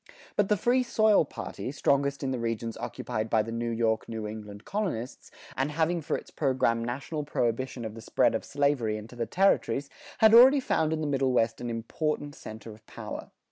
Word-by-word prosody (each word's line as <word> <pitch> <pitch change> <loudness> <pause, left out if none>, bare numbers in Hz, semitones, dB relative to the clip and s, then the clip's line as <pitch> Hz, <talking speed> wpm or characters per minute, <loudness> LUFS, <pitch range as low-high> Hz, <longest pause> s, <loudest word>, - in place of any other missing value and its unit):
But 205 -1 +2
the 210 - +3
Free 245 +6 +3
Soil 215 -7 +3
party, 130 - -6
strongest 140 0 +1
in 135 - -1
the 130 - -2
regions 115 0 -3
occupied 110 +1 -4
by 110 -1 +3
the 115 - -6
New 115 +1 -2
York 115 -1 0
New 110 -1 -4
England 105 -1 -8
colonists, 175 - -3 0.3
and 135 +2 0
having 165 +3 0
for 145 - -1
its - - -12
program 130 -5 +1
national 135 +6 -4
prohibition 125 -2 -2
of 110 - -5
the 115 - -9
spread - - +2
of - - -2
slavery 140 -7 0
into 110 +3 -10
the 115 -1 -3
territories, 145 - +2 0.3
had 220 0 +6
already 260 +4 +9
found 160 -11 +1
in 160 -1 -1
the - - -1
Middle 135 -2 +1
West 115 -2 +1
an 120 - -3
important 145 +6 -2
center 110 -2 -9
of 110 +1 -17
power. - - -7
130 Hz, 195 wpm, -28 LUFS, 115-155 Hz, 0.3 s, already